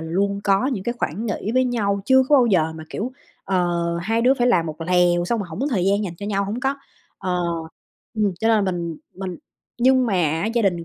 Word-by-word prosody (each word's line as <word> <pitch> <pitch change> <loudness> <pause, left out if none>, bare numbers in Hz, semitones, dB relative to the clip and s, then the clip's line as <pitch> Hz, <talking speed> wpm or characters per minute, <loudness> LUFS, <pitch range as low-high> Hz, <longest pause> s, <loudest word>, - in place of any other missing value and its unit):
luôn 200 +5 -1
có 195 +5 +3
những 225 -9 -2
cái 235 - 0
khoảng 210 +10 -2
nghỉ 215 0 -3
với 255 0 +4
nhau, 205 -5 0
chưa 265 +2 +5
có 295 - +6
bao 250 -3 +5
giờ 160 -6 +2
mà, 160 0 -9
kiểu, 245 +5 -4 0.3
ờ, 175 -2 0 0.2
2 225 +5 0
đứa 255 +3 +5
phải 245 -2 +1
làm 175 -9 +3
một 155 +1 -7
lèo 175 0 +2
xong 230 +6 0
rồi 195 - -4
hổng 160 - -7
có 275 - 0
thời 195 -8 +1
gian 200 +2 +2
dành 175 -4 -5
cho 200 - -6
nhau, 200 -1 0
hổng 210 +5 -4
có. 270 +2 0 0.4
Ờ, 180 -1 -1 0.7
ừm, 210 -3 +1
cho 225 - +2
nên 220 -3 +3
là 190 - 0
mình 170 -2 -4 0.2
mình 185 -2 -5 0.4
nhưng 255 +1 +4
mà 220 - -1
á 165 0 +1
gia 235 - +2
đình 175 -4 0
200 Hz, 245 wpm, -22 LUFS, 175-235 Hz, 0.7 s, có